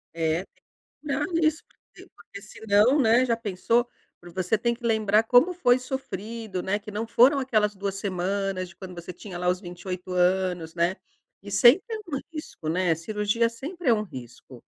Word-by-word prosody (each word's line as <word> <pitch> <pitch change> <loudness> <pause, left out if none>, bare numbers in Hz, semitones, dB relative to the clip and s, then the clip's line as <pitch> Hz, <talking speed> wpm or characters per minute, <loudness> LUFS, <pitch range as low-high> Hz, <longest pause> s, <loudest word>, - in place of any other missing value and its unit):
É, 165 +3 0
tem - - -48
que - - -34 0.4
cuidar 295 0 -2
disso, 310 0 +1
porque - - -19
porque 200 - -12
senão, 215 +6 +2
né, 235 +2 +4
já 230 -2 0
pensou, 230 +3 0 0.5
você 185 +3 +1
tem 235 +2 0
que 240 0 -10
lembrar 220 -1 +3
como 250 +10 +4
foi 255 -8 +3
sofrido, 225 -6 -5
né, 190 +3 0
que 210 0 -10
não 215 +2 -3
foram 255 +5 +5
aquelas 215 -6 +1
2 195 0 -4
semanas 195 -1 -2
de - - -16
quando 185 -2 -9
você 175 +1 -8
tinha 180 0 -9
lá 180 - -2
os 180 +1 +1
28 180 0 -7
anos, 180 -2 +1
né, 175 +3 +1 0.4
e 200 - -10
sempre 240 - +6
é - - -5
um 275 - 0
risco, 305 - -7
né, 175 +1 +2
cirurgia 210 +7 0
sempre 290 +8 -7
é 235 - +7
um 210 -1 0
risco. 130 - -11
205 Hz, 185 wpm, -26 LUFS, 185-235 Hz, 0.5 s, é